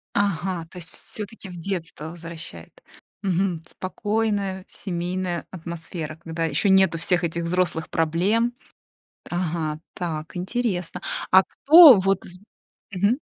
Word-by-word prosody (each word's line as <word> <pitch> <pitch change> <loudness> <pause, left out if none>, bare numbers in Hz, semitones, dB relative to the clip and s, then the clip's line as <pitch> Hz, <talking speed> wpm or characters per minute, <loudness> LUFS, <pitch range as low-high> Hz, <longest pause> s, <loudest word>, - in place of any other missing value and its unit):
Ага, 185 -3 0
то 180 - -12
есть 170 - -6
всё-таки 210 -2 -5
в 180 - -9
детство 165 -4 -4
возвращает. 165 - -8 0.4
Мгм, 190 -2 0
спокойная 200 0 -2
семейная 180 -1 -3
атмосфера, 165 -2 -5
когда 165 0 -2
ещё 160 +6 +2
нету 190 -3 +5
всех 175 +1 +2
этих 170 0 -2
взрослых 175 -1 0
проблем. 190 +9 +1 0.8
Ага, 160 -3 -2
так, 160 -2 -5
интересно, 180 -2 -2 0.3
а 190 0 +8
кто 310 - +8
вот 195 0 +1 0.7
Мгм. 200 +7 +1
180 Hz, 110 wpm, -24 LUFS, 165-195 Hz, 0.8 s, а